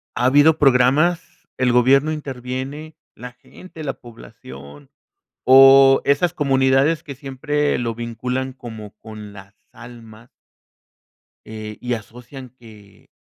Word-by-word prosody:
Ha 125 Hz, -, -1 dB
habido 145 Hz, +4 st, +4 dB
programas, 145 Hz, +6 st, +1 dB
el 125 Hz, -1 st, +1 dB
gobierno 135 Hz, +5 st, +3 dB
interviene, 135 Hz, +1 st, -7 dB, 0.2 s
la 125 Hz, +1 st, -11 dB
gente, 160 Hz, +5 st, -14 dB
la 135 Hz, -2 st, -4 dB
población 70 Hz, -, -15 dB, 0.6 s
o 135 Hz, +1 st, +6 dB
esas 155 Hz, +5 st, 0 dB
comunidades 135 Hz, +1 st, +1 dB
que 140 Hz, -, -9 dB
siempre 145 Hz, +2 st, -3 dB
lo 115 Hz, -2 st, -3 dB
vinculan 125 Hz, +3 st, -5 dB
como 110 Hz, -5 st, -11 dB
con 110 Hz, -2 st, -11 dB
las 100 Hz, 0 st, -15 dB, 0.2 s
almas 115 Hz, -1 st, -15 dB, 1.2 s
eh, 110 Hz, -1 st, -9 dB
y 125 Hz, 0 st, -3 dB
asocian 125 Hz, +4 st, -10 dB
que, 110 Hz, -5 st, -19 dB
125 Hz, 115 wpm, -19 LUFS, 115-140 Hz, 1.2 s, o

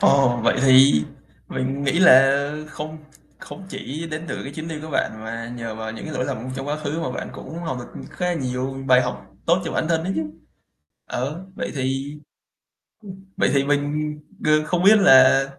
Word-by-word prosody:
Ồ, 130 Hz, -3 st, +4 dB
vậy -, -, +3 dB
thì 130 Hz, -, +6 dB, 0.4 s
mình 135 Hz, +2 st, -3 dB
nghĩ 140 Hz, +4 st, +1 dB
là 135 Hz, -5 st, +7 dB, 0.3 s
không 155 Hz, +1 st, -7 dB, 0.4 s
không 195 Hz, -, -10 dB
chỉ 160 Hz, -2 st, -6 dB
đến 155 Hz, +2 st, -5 dB
từ -, -, -4 dB
cái 140 Hz, -, -7 dB
chuyến 155 Hz, +2 st, -6 dB
đi 160 Hz, -2 st, -5 dB
của 155 Hz, -, -8 dB
bạn -, -, 0 dB
mà 115 Hz, +1 st, -6 dB
nhờ 115 Hz, -2 st, -5 dB
vào 110 Hz, 0 st, -6 dB
những 110 Hz, -, -8 dB
cái 155 Hz, -, -6 dB
lỗi -, -, -1 dB
lầm 120 Hz, +1 st, -4 dB
trong 135 Hz, +1 st, -5 dB
quá 150 Hz, -, -1 dB
khứ 155 Hz, +1 st, -4 dB
mà 130 Hz, -, -2 dB
bạn -, -, -5 dB
cũng 165 Hz, -, -9 dB
học 160 Hz, -7 st, -4 dB
được 120 Hz, -, -10 dB
khá 180 Hz, -, -3 dB
là 180 Hz, -, 0 dB
nhiều 135 Hz, -1 st, -3 dB
bài 125 Hz, -1 st, +6 dB
học 100 Hz, -, -5 dB, 0.2 s
tốt 170 Hz, +2 st, +4 dB
cho -, -, -4 dB
bản 160 Hz, -, -1 dB
thân 165 Hz, -1 st, +1 dB
ấy 190 Hz, -, -1 dB
chứ. 160 Hz, -, 0 dB, 0.8 s
Ờ, 150 Hz, +9 st, -4 dB
vậy -, -, -4 dB
thì 135 Hz, +1 st, -2 dB, 1.1 s
ừm, 190 Hz, -, -18 dB
vậy -, -, +2 dB
thì 140 Hz, 0 st, +3 dB
mình 145 Hz, +1 st, 0 dB, 0.3 s
g -, -, -2 dB, 0.2 s
không 180 Hz, +2 st, 0 dB
biết 215 Hz, +2 st, +8 dB
là 135 Hz, -5 st, +7 dB
140 Hz, 205 wpm, -22 LUFS, 130-160 Hz, 1.1 s, biết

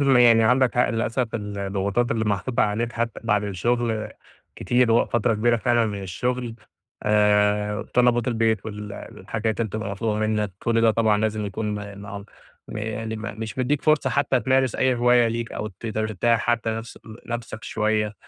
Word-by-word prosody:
يعني 125 Hz, -5 st, +6 dB
عندك 125 Hz, +2 st, +3 dB
حق 125 Hz, -, +3 dB
للأسف 115 Hz, +1 st, -1 dB
الضغوطات 100 Hz, +1 st, -2 dB
اللي 110 Hz, -1 st, 0 dB
محطوطة 105 Hz, +5 st, 0 dB
عليك 110 Hz, +3 st, -1 dB
حتى 115 Hz, -1 st, -3 dB
بعد 105 Hz, -2 st, +1 dB
الشغل 110 Hz, +2 st, -1 dB, 0.5 s
كتير، 120 Hz, -1 st, +2 dB
وفترة 120 Hz, 0 st, +2 dB
كبيرة 120 Hz, +2 st, +2 dB
فعلًا 115 Hz, 0 st, +2 dB
من 100 Hz, -2 st, -4 dB
الشغل 120 Hz, +5 st, -3 dB, 0.5 s
آآ، 105 Hz, 0 st, +2 dB
طلبات 120 Hz, 0 st, +3 dB
البيت 110 Hz, -3 st, +1 dB
والحاجات 105 Hz, +1 st, -5 dB
اللي 110 Hz, -, 0 dB
بتبقى 110 Hz, 0 st, -4 dB
مطلوبة 105 Hz, +1 st, -2 dB
منك، 105 Hz, -2 st, 0 dB
كُلّ 115 Hz, -1 st, +1 dB
ده 115 Hz, -1 st, +5 dB
طبعًا 110 Hz, -2 st, +2 dB
لازم 110 Hz, -1 st, -1 dB
يكون 105 Hz, +1 st, -3 dB
آآ، 100 Hz, -1 st, -8 dB, 0.7 s
ما 110 Hz, -, -5 dB
يعني 110 Hz, +1 st, -4 dB
مش 110 Hz, +3 st, -6 dB
مدّيك 140 Hz, +3 st, 0 dB
فرصة 155 Hz, -4 st, +2 dB
حتى 135 Hz, -1 st, +1 dB
تمارس 130 Hz, -2 st, +2 dB
أي 130 Hz, -1 st, +2 dB
هواية 120 Hz, -1 st, +4 dB
ليك، 115 Hz, 0 st, -4 dB
أو 105 Hz, -, -4 dB
تقدر 110 Hz, +2 st, -4 dB
ترتاح 115 Hz, +2 st, +1 dB
حتى 115 Hz, -1 st, 0 dB
نف 115 Hz, +1 st, -6 dB, 0.3 s
نفسك 115 Hz, -2 st, -6 dB
شوية، 105 Hz, -1 st, 0 dB
110 Hz, 160 wpm, -24 LUFS, 105-120 Hz, 0.7 s, يعني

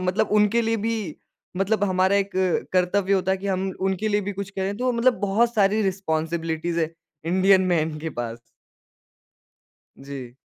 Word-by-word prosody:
मतलब 185 Hz, +1 st, 0 dB
उनके 210 Hz, +2 st, +3 dB
लिए 225 Hz, 0 st, +1 dB
भी 225 Hz, +2 st, -1 dB, 0.6 s
मतलब 205 Hz, +2 st, +1 dB
हमारा 185 Hz, +1 st, +2 dB
एक 200 Hz, 0 st, 0 dB, 0.4 s
कर्तव्य 185 Hz, +2 st, +2 dB
होता 190 Hz, -1 st, +2 dB
है 190 Hz, -, +1 dB
कि 200 Hz, -, -6 dB
हम 190 Hz, 0 st, -1 dB
उनके 190 Hz, +3 st, 0 dB
लिए 205 Hz, 0 st, +1 dB
भी 205 Hz, +1 st, -4 dB
कुछ 200 Hz, 0 st, -6 dB
करें, 195 Hz, +1 st, -3 dB
तो 250 Hz, +1 st, 0 dB
मतलब 240 Hz, +1 st, +3 dB
बहुत 220 Hz, +4 st, +1 dB
सारी 210 Hz, +1 st, +3 dB
रिस्पॉन्सिबिलिटीज़ 165 Hz, -3 st, -2 dB
है, 160 Hz, +1 st, -1 dB, 0.3 s
इंडियन 190 Hz, +2 st, +4 dB
मैन 155 Hz, -2 st, 0 dB
के 160 Hz, +1 st, -4 dB
पास। 115 Hz, -1 st, -5 dB, 1.6 s
जी। 135 Hz, -3 st, -9 dB
190 Hz, 160 wpm, -24 LUFS, 170-205 Hz, 1.6 s, इंडियन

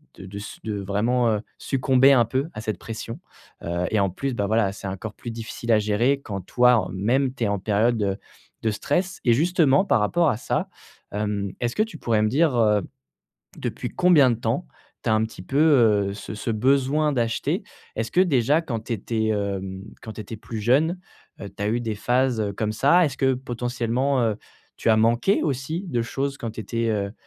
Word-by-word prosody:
de 95 Hz, -, -10 dB
de 100 Hz, +2 st, -8 dB
s 105 Hz, -, -8 dB
de 105 Hz, -2 st, -3 dB
vraiment, 115 Hz, +5 st, +1 dB
heu, 105 Hz, -1 st, 0 dB, 0.2 s
succomber 135 Hz, 0 st, +4 dB
un 120 Hz, -3 st, +5 dB
peu 135 Hz, +7 st, -2 dB
à 110 Hz, -, -6 dB
cette 110 Hz, -4 st, -3 dB
pression. 115 Hz, +1 st, -7 dB, 0.4 s
Heu 85 Hz, +1 st, -2 dB
et 110 Hz, -, +2 dB
en 100 Hz, -1 st, +2 dB
plus, 135 Hz, +8 st, -3 dB
bah 100 Hz, -3 st, -1 dB
voilà, 110 Hz, -2 st, +2 dB
c'est 100 Hz, -, -7 dB
encore 100 Hz, +3 st, -5 dB
plus 120 Hz, -, -8 dB
difficile 115 Hz, +1 st, -5 dB
à 110 Hz, -, +6 dB
gérer 115 Hz, +7 st, +1 dB
quand 100 Hz, -5 st, -5 dB
toi, 125 Hz, +6 st, +4 dB
en -, -, -1 dB
même, 125 Hz, +8 st, +1 dB
tu 120 Hz, -, -3 dB
es -, -, +2 dB
en 100 Hz, -1 st, -1 dB
période, 110 Hz, +3 st, +1 dB
heu, 100 Hz, 0 st, -1 dB, 0.5 s
de 110 Hz, -, +2 dB
stress 175 Hz, -, -1 dB
et 120 Hz, -, +5 dB
justement 160 Hz, +2 st, +3 dB
par 130 Hz, -, +3 dB
rapport 160 Hz, +10 st, +2 dB
à 110 Hz, -, 0 dB
ça, -, -, -2 dB, 0.4 s
hem, 105 Hz, -1 st, -2 dB
est-ce 120 Hz, -1 st, -2 dB
que -, -, +1 dB
tu 220 Hz, -, -8 dB
pourrais 110 Hz, -2 st, +1 dB
me 110 Hz, -, +3 dB
dire, 145 Hz, +1 st, +2 dB
heu, 105 Hz, -3 st, +3 dB, 0.8 s
depuis -, -, -4 dB
combien 160 Hz, -8 st, +5 dB
de 115 Hz, -, 0 dB
temps 115 Hz, -, -2 dB, 0.4 s
tu -, -, -3 dB
as -, -, +4 dB
un 110 Hz, 0 st, +2 dB
petit 110 Hz, -, -8 dB
peu, 135 Hz, -, -5 dB
heu, 115 Hz, -10 st, +4 dB
ce 105 Hz, +1 st, -7 dB
ce 110 Hz, +2 st, -4 dB
besoin 135 Hz, +6 st, +2 dB
d'acheter? 115 Hz, -2 st, -1 dB, 0.3 s
Est-ce 110 Hz, +1 st, -2 dB
que 180 Hz, -, +4 dB
déjà 145 Hz, -3 st, +3 dB
quand 115 Hz, -8 st, -3 dB
tu -, -, -4 dB
étais, 110 Hz, +1 st, -2 dB
hem, 95 Hz, -2 st, -2 dB, 0.2 s
quand 110 Hz, -2 st, -7 dB
tu 110 Hz, -, -7 dB
étais 110 Hz, +2 st, -8 dB
plus 110 Hz, +1 st, -7 dB
jeune, 150 Hz, -, +2 dB, 0.4 s
heu, 100 Hz, -, -6 dB
tu 100 Hz, -, -8 dB
as 105 Hz, -, 0 dB
eu 115 Hz, +3 st, 0 dB
des 110 Hz, -2 st, -3 dB
phases, 125 Hz, +2 st, +1 dB
heu, 100 Hz, -1 st, -1 dB
comme 110 Hz, +2 st, -2 dB
ça? 155 Hz, +10 st, +4 dB
Est-ce 135 Hz, -, -4 dB
que 130 Hz, 0 st, +2 dB
potentiellement, 125 Hz, +1 st, -1 dB
heu, 110 Hz, -3 st, +1 dB, 0.4 s
tu 115 Hz, -, +1 dB
as 110 Hz, -, +5 dB
manqué 120 Hz, -, +3 dB
aussi 155 Hz, +6 st, -2 dB
de 120 Hz, -5 st, 0 dB
choses 135 Hz, +3 st, -3 dB
quand 115 Hz, -, -4 dB
tu 110 Hz, -, -7 dB
étais, 115 Hz, +1 st, -2 dB
heu, 100 Hz, -1 st, -1 dB
115 Hz, 215 wpm, -24 LUFS, 105-135 Hz, 0.8 s, à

